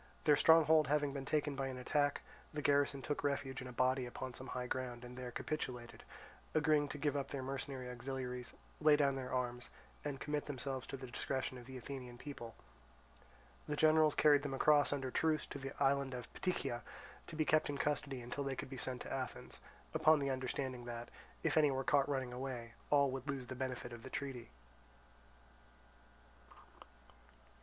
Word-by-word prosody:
Their 150 - +6
stronghold 160 -1 +6
having 145 0 +2
been 135 -1 -4
taken 145 -1 +1
by 135 0 -1
an 130 -1 -4
attack, 145 +3 +1 0.3
the 150 - -3
garrison 145 -1 +3
took 145 +3 -2
refuge 135 -2 -1
in 130 - -6
a - - -7
body 130 +1 +2
upon 130 +1 -5
some 130 - -6
high 125 0 -3
ground 125 -1 -3
and 125 0 -9
there 125 -1 -5
capitulated, 125 -4 -4 0.5
agreeing 150 -1 +4
to 145 - -5
give 145 -1 0
up 140 -1 -1
their 135 -2 -4
mercenary 135 -1 -4
auxiliaries, 125 0 -4 0.2
lay 150 -1 +7
down 140 -2 +3
their 130 -1 -4
arms, 125 -1 -2 0.3
and 145 -2 -3
commit 150 0 -2
themselves 135 -2 -4
to 135 - -5
the 130 - -7
discretion 130 +1 -3
of 120 - -12
the 130 -1 -7
Athenian 125 -1 -7
people. 120 -4 -7 1.1
The 150 - -1
generals 155 0 +5
carried 145 -2 +6
them 140 -2 -3
across 145 +1 +5
under 135 -2 -1
truce 155 +2 +2
to 140 - -7
the 135 0 -5
island 140 -1 +2
of 125 -1 -8
Ptychia, 150 -9 -1 0.5
to 165 - -7
be 155 0 +1
kept 155 0 +3
in 145 - -2
custody 140 -2 -1
until 120 +4 -3
they 135 -1 -2
could 130 - -6
be 135 - -5
sent 125 0 -3
to - - -5
Athens, 130 -1 -5 0.3
upon 155 0 +6
the 140 -1 0
understanding 130 -1 -3
that, 120 0 -5 0.3
if - - +2
any 150 -2 +6
were 135 -1 0
caught 140 0 +3
running 130 -3 -1
away, 125 -2 -5 0.2
all 140 -2 +5
would 135 +2 -5
lose 135 -2 -2
the 125 - -6
benefit 125 -1 -4
of 120 - -8
the 130 - -8
treaty. 135 -4 -4
135 Hz, 185 wpm, -37 LUFS, 125-145 Hz, 1.1 s, lay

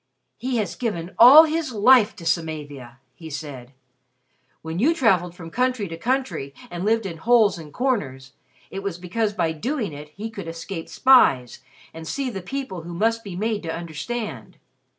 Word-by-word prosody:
"He 255 -1 -2
has 200 -6 -2
given 185 -8 -4
all 270 +7 +10
his 320 -3 -1
life 220 -1 +5
to 175 -5 -11
Samavia!" 145 -7 -3 0.2
he 160 +4 -11
said. 140 -4 -7 0.9
"When 160 +2 -4
you 310 +9 +3
traveled 180 - +2
from 165 -2 -10
country 250 -3 0
to 165 - -6
country, 240 - -2 0.2
and 175 +1 -5
lived 225 +1 +1
in 170 -4 -5
holes 215 -1 +3
and 155 -2 -11
corners, 135 - -2 0.4
it 195 - -5
was 195 -4 -4
because 205 +4 -2
by 165 -5 0
doing 220 - -3
it 150 +1 -9
he 215 +8 -7
could 200 -6 -8
escape 165 +1 -6
spies, 135 - +4 0.3
and 160 0 -9
see 270 +3 -2
the 195 -3 -6
people 195 -3 -5
who 170 +1 -8
must 225 +4 0
be 195 -5 -7
made 215 +2 -1
to 165 - -4
understand. 165 - -6
190 Hz, 170 wpm, -23 LUFS, 160-235 Hz, 0.9 s, all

